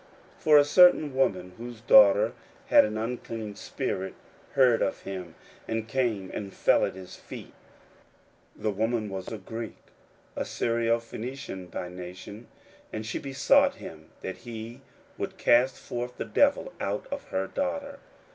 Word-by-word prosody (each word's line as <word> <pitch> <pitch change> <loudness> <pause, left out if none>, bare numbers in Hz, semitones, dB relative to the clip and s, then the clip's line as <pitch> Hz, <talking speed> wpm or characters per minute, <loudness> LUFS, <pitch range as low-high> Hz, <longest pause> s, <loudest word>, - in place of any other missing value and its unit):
41:007:025 - - -23
For 150 -1 +8
a 145 - +7
certain 155 -3 +6
woman, 95 -9 +1
whose 120 0 -7
young 110 - -19
daughter 100 -2 +7 0.4
had - - +7
an 105 0 -3
unclean 115 -2 -4
spirit, 100 -3 -4 0.4
heard 125 -4 +4
of - - -1
him, 90 -4 -6 0.3
and 115 0 -2
came 115 -6 -1
and 100 -2 -6
fell - - +4
at - - -5
his 95 -1 -10
feet: - - -10 1.0
41:007:026 - - -16
The 110 - +2
woman 110 +1 -1
was 95 -1 -6
a 110 - -5
Greek, 115 +1 -7 0.6
a - - -3
Syrophenician 115 -3 -2
by 90 - -5
nation; 90 +5 -9 0.4
and 110 0 -5
she 110 - -3
besought 275 - +3
him 80 -1 -11
that 95 - -5
he 115 +2 -8 0.4
would - - -4
cast 125 +2 +4
forth 125 +1 -5
the - - -3
devil 285 - +2
out - - -2
of 280 0 -4
her 95 - -2
daughter. 280 - -3
115 Hz, 155 wpm, -28 LUFS, 100-130 Hz, 1.0 s, For